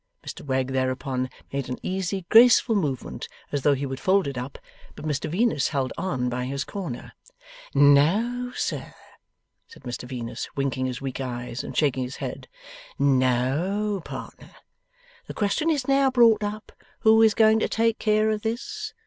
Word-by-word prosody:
Mr - - -7
Wegg 130 -2 -1
thereupon 130 0 -1 0.2
made 140 -1 -3
an 125 - -3
easy, 190 0 -2
graceful 235 0 +7
movement, 145 - -2 0.2
as 145 - -1
though 145 +1 +3
he 140 +1 -3
would 135 -1 -5
fold 195 +1 +2
it 140 - -4
up; 125 +2 -6 0.4
but - - -9
Mr 150 -2 -2
Venus 185 - +1
held 135 -3 -2
on 170 -9 -2
by 125 0 -2
his 140 +2 -2
corner. 175 -12 -6 0.6
'No, 190 - +4
sir,' - - -3 0.7
said 460 - -16
Mr 125 0 -6
Venus, 120 -3 -5
winking 135 -2 -1
his 125 0 -5
weak 135 0 -4
eyes 120 -2 -5
and - - -7
shaking 140 -4 +2
his 125 +2 -6
head. - - -6 0.5
'No, 140 +10 +1
partner. - - -9 0.7
The - - -7
question 215 +10 0
is 285 -5 0
now 275 0 +4
brought 230 -4 +5
up, 210 +1 -5 0.3
who 220 0 +6
is 220 -2 +5
going 220 0 +5
to - - 0
take 230 0 +1
care 215 0 +2
of 215 -1 -2
this. 415 - -4
150 Hz, 165 wpm, -25 LUFS, 130-220 Hz, 0.7 s, graceful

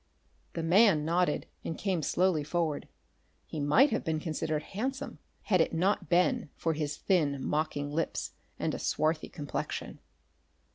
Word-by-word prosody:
The 165 - -3
man 175 -2 +5
nodded 170 -1 +1 0.2
and 165 - -4
came 190 -5 0
slowly 170 +1 +2
forward. 155 -1 -1 0.6
He 155 - -6
might 150 - +5
have 220 - 0
been 160 -1 -1
considered 155 -1 -2
handsome, 265 - -4 0.2
had 185 -5 +3
it 165 - 0
not 190 +5 +1
been 175 -3 +2
for 165 - 0
his 150 -1 -3
thin, 145 -7 +1
mocking 150 -1 -1
lips 165 +3 -2 0.3
and - - -1
a - - -3
swarthy 155 +1 0
complexion. 145 -4 -5
165 Hz, 145 wpm, -30 LUFS, 150-185 Hz, 0.6 s, man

